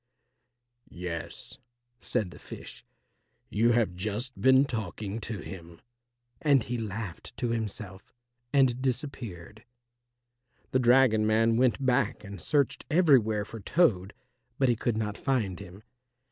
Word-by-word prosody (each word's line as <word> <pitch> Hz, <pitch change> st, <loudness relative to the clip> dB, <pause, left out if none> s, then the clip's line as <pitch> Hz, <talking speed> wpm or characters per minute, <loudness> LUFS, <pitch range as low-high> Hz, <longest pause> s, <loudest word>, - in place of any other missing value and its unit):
"Yes," 85 Hz, +4 st, -7 dB, 0.4 s
said 110 Hz, -8 st, -2 dB
the -, -, -13 dB
fish, -, -, -10 dB, 0.7 s
"you 115 Hz, +3 st, +3 dB
have 115 Hz, -6 st, +2 dB
just 105 Hz, +7 st, -4 dB
been 130 Hz, +1 st, +6 dB
talking 110 Hz, -3 st, -4 dB
to 110 Hz, -3 st, -5 dB
him," 85 Hz, -3 st, -10 dB, 0.6 s
and 140 Hz, -5 st, +4 dB
he 120 Hz, +1 st, -3 dB
laughed 105 Hz, -4 st, -6 dB
to 120 Hz, -, -1 dB
himself 105 Hz, -4 st, -5 dB, 0.4 s
and 130 Hz, -3 st, +3 dB
disappeared. 120 Hz, -, -4 dB, 1.1 s
The 130 Hz, -, +3 dB
dragon 120 Hz, -3 st, +4 dB
man 115 Hz, +1 st, +3 dB
went 130 Hz, +2 st, +2 dB
back 125 Hz, -2 st, +1 dB
and 100 Hz, -2 st, -8 dB
searched 140 Hz, -3 st, +1 dB
everywhere 125 Hz, -, +4 dB
for 115 Hz, -, -9 dB
Toad, 100 Hz, -, +1 dB, 0.4 s
but 135 Hz, -2 st, +3 dB
he 120 Hz, -, +3 dB
could 115 Hz, 0 st, -1 dB
not 105 Hz, -1 st, -3 dB
find 110 Hz, -, -1 dB
him. 95 Hz, +4 st, -11 dB
115 Hz, 125 wpm, -28 LUFS, 100-130 Hz, 1.1 s, been